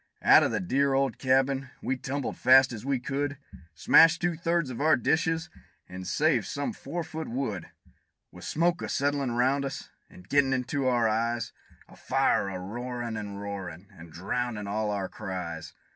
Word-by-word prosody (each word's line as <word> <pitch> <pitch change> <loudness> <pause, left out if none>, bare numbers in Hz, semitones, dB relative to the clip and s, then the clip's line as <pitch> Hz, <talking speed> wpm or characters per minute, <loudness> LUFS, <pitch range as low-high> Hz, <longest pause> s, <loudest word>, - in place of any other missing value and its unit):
Out - - +8
o' - - +2
the - - -1
dear 140 -5 +1
old 135 -3 0
cabin 135 0 +1
we 135 - -1
tumbled 135 +1 -4
fast 130 0 +5
as 110 -2 -7
we 135 -1 0
could 140 +3 -3 0.4
Smashed 165 - +6
two 175 -1 0
thirds 165 -3 0
of 125 - -6
our 155 +1 +5
dishes, 160 +5 0 0.4
and 90 0 -8
saved - - +1
some 145 0 -3
four 165 +5 -5
foot 160 0 -6
wood; 115 -9 -3 0.6
With - - -13
smoke 170 +2 0
a - - -4
settlin' 140 -3 0
round 130 +4 +2
us 135 - -6 0.2
and 90 +1 -16
gettin' 140 0 +3
into 130 +1 -1
our 120 -3 +3
eyes, 115 +2 -1 0.3
And - - -17
fire 100 - +1
a 95 - -5
roarin' 120 +4 -5
an' 105 -2 -5
roarin' 100 -2 -7
an' 85 0 -12
drowndin' 105 +6 -3
all 105 +2 -2
of 105 - -1
our 95 -2 -2
cries. 85 -4 -6
130 Hz, 175 wpm, -28 LUFS, 105-140 Hz, 0.6 s, Out